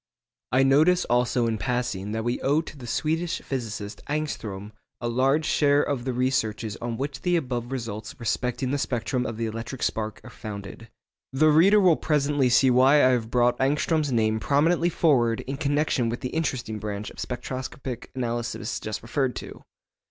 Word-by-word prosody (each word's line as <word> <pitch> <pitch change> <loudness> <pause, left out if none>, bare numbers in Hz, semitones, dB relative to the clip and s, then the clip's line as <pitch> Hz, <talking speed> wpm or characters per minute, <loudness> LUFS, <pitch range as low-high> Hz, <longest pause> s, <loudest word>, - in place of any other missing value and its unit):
I 130 +2 +4
notice 155 +7 +4
also 120 0 +1
in 110 -2 -1
passing 105 -3 -2
that 110 +1 -2
we 120 +1 -1
owe 145 +3 +2
to 160 - -10
the 125 -4 -10
Swedish 160 +6 -1
physicist 110 -5 -5
Ångström 110 -10 -3 0.3
a 120 - -3
large 135 +6 +2
share 145 -2 +3
of 130 -4 -2
the 130 - 0
researches 115 -4 -1
on 115 -1 -4
which 135 -1 -4
the 180 0 +1
above 125 -6 -2
results 110 -4 -5
respecting 125 +2 -1
the 145 - 0
spectrum 125 -1 -1
of 110 -1 -5
the 115 - -1
electric 115 +3 -5
spark 110 -1 -2
are - - -11
founded. 105 +1 -8 0.4
The 155 +4 +4
reader 180 +8 +6
will 180 -5 +5
presently 145 -3 +1
see 130 +1 +5
why 130 +3 +5
I 145 -3 +6
have 120 -3 0
brought 120 0 +2
Ångström's 150 +2 +1
name 110 -2 +1
prominently 165 +7 +2
forward 125 -10 +2
in 135 +1 -5
connection 145 -4 +1
with 120 - -4
the 125 - -3
interesting 125 -9 -2
branch 105 0 -5
of - - -16
spectroscopic 125 0 -5
analysis 120 -3 -3
just 110 0 -5
referred 130 +1 -1
to. - - -8
125 Hz, 175 wpm, -25 LUFS, 115-145 Hz, 0.4 s, reader